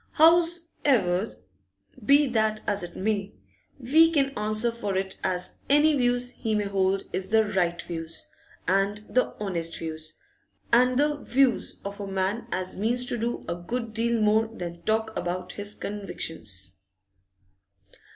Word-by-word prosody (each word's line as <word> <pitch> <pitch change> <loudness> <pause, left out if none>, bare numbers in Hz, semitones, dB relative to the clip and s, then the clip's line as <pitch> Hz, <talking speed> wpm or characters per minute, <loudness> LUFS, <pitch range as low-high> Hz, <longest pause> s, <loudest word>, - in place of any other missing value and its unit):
'Hows'ever, 320 - +3 0.8
be 285 +1 +6
that 220 -4 +1
as 205 -1 +1
it 175 0 -6
may, 205 0 -2 0.4
we 310 +6 +5
can 275 -4 +2
answer 215 +2 +1
for 205 -5 -3
it 190 0 -2
as 180 -1 -1
any 295 +2 +5
views 245 -1 +1
he 220 -3 -2
may 210 - +1
hold 195 -1 +1
is 190 0 -2
the 220 +1 +5
right 180 -4 0
views, 165 -1 -4 0.4
and 200 +2 +1
the 255 - +1
honest 170 -5 -2
views, 155 -1 -5 0.6
and 250 +1 +5
the 295 +1 +2
views 260 -3 +1
of 200 +1 -6
a 200 - -4
man 195 +3 -1
as 185 0 -2
means 240 +5 0
to 245 - 0
do 235 +1 -3
a - - -1
good 225 +7 -4
deal 230 +1 +1
more 215 +1 +3
than 175 -6 -7
talk 220 +1 0
about 180 +1 -3
his 205 0 -5
convictions! 105 - -4
210 Hz, 145 wpm, -26 LUFS, 185-245 Hz, 0.8 s, be